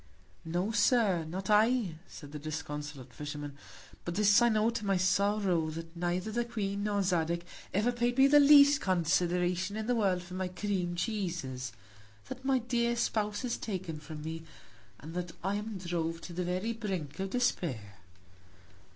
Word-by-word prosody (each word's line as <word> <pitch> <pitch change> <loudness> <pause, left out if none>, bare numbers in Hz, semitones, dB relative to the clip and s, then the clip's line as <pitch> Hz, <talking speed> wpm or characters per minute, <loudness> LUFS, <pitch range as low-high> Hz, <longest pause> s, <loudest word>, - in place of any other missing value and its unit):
No 175 +6 -1
Sir, 210 -6 +3
not 190 +5 -4
I, 215 -2 +3
said 145 -2 -11
the 150 - -6
disconsolate 150 -3 -6
Fisherman; 145 -1 -6 0.5
but 170 - -4
this 205 +2 +5
I 240 - +5
know, 220 +1 +2
to 230 -2 -4
my 195 -2 +2
Sorrow, 190 -2 +2
that 165 +1 -7
neither 175 +4 -1
the 240 +2 0
Queen, 205 -3 -3
nor 205 -1 +1
Zadig, 170 -2 0 0.3
ever 215 +5 +2
paid 240 +1 0
me 270 - +7
the 290 +1 +7
least 285 0 +7
Consideration 180 +2 +1
in 220 - -3
the 245 - +1
World 195 -6 +1
for 180 +1 -11
my 185 0 -2
Cream 180 -2 -2
Cheeses; 170 - -3 0.6
that 260 - -7
my 270 -1 +3
dear 240 -1 0
Spouse 215 0 -1
is 240 - -1
taken 185 -7 -4
from 150 0 -8
me; 160 +1 -5 0.6
and 155 +3 -9
that 175 -1 -4
I 195 +2 0
am 210 0 -5
drove 170 -2 -2
to 175 - -8
the 180 +1 -2
very 185 +6 -1
Brink 190 -10 -4
of 195 0 -2
Despair. 135 - -1
185 Hz, 170 wpm, -31 LUFS, 165-215 Hz, 0.6 s, me